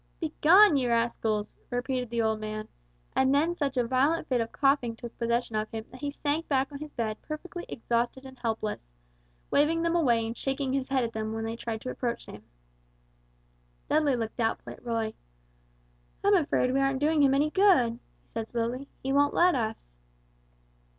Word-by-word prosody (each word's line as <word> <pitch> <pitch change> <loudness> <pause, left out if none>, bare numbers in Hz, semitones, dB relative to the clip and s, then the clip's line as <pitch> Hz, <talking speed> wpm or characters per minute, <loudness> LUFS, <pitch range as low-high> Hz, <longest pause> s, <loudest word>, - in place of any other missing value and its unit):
"Begone, 330 +2 +5
ye 255 -2 +1
rascals!" 230 -3 0
repeated 250 0 -2
the 235 -1 0
old 220 -1 +1
man, 215 0 -5 0.5
and 265 0 +3
then 320 +4 +2
such 280 -5 -2
a 245 - +3
violent 265 +7 +1
fit 250 -3 +1
of 230 - -3
coughing 275 -5 +2
took 235 0 -9
possession 235 -1 0
of 215 0 -1
him 220 -1 -6
that 255 - -12
he 290 - -1
sank 295 +3 -2
back 270 0 +1
on 280 - -7
his 305 0 -7
bed 220 -3 -3
perfectly 345 +3 -7
exhausted 240 +2 -1
and 260 -1 -12
helpless, 220 - -3 0.6
waving 325 +3 +3
them 335 0 +1
away 240 -9 +3
and 225 +1 -4
shaking 270 +1 -2
his 270 -1 -1
head 265 -2 +2
at 230 -1 -3
them 220 0 -3
when 225 0 -3
they 225 +1 -3
tried 225 -1 -5
to 255 - -4
approach 240 -2 -3
him. 105 - -10 1.5
Dudley 295 -3 +3
looked 225 -2 -4
doubtfully 225 -2 -2
at - - -21
Roy. 225 -2 -1 1.1
"I'm 405 +1 +4
afraid 285 -7 +2
we 270 - +2
aren't 270 -1 +1
doing 305 +1 +3
him 275 -1 +5
any 295 +2 +2
good," 280 - +4 0.2
he - - -36
said, 225 -1 -4
slowly. 240 +3 -2 0.2
"He 270 +1 -1
won't 285 +1 +3
let 355 +1 +5
us." 225 -4 -2
255 Hz, 185 wpm, -28 LUFS, 230-285 Hz, 1.5 s, Begone